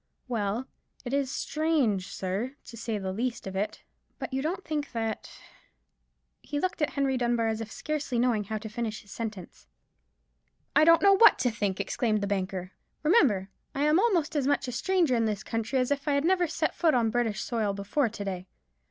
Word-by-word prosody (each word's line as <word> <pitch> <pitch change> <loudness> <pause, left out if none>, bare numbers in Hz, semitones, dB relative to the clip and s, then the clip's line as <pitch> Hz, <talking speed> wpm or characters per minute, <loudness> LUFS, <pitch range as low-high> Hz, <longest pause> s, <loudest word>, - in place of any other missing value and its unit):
"Well, 225 0 -1 0.4
it 245 - -4
is 280 -2 +1
strange, 275 - 0
sir, 195 +10 -3
to - - -10
say 230 -1 -3
the 190 -2 -3
least 240 +4 -2
of 190 0 -6
it. 200 +2 -2 0.3
But - - -6
you 265 - 0
don't 345 +6 -3
think 295 -3 -3
that——" 225 -2 -3 1.1
He 290 +1 -3
looked 370 0 -2
at 300 - +1
Henry 275 -2 +1
Dunbar 240 -2 +1
as 220 0 -1
if 220 -1 -6
scarcely 300 -5 -3
knowing 235 -4 +2
how 215 +2 -3
to 215 +1 -7
finish 220 -1 -4
his 205 - -17
sentence. 210 - -7 1.1
"I 310 - +7
don't 335 +2 +6
know 400 0 +7
what 445 +3 +7
to 250 -1 +1
think," 205 -3 -2
exclaimed 215 +2 0
the - - 0
banker. 190 -2 -2 0.3
"Remember, 260 - +4 0.3
I 280 - 0
am 305 +3 +4
almost 355 -9 +2
as 280 -3 +1
much 285 -1 +1
a - - -3
stranger 330 +2 +2
in 230 -1 +2
this 210 -2 -2
country 225 +3 -2
as 255 +1 +1
if 285 +1 -1
I 290 - +3
had 280 +2 +1
never 360 0 +3
set 325 - -1
foot 320 -5 +2
on 230 -2 +2
British 230 -2 0
soil 220 -4 0
before 205 +6 0
to 205 -1 -6
day. 185 -1 -4
240 Hz, 200 wpm, -28 LUFS, 210-290 Hz, 1.1 s, I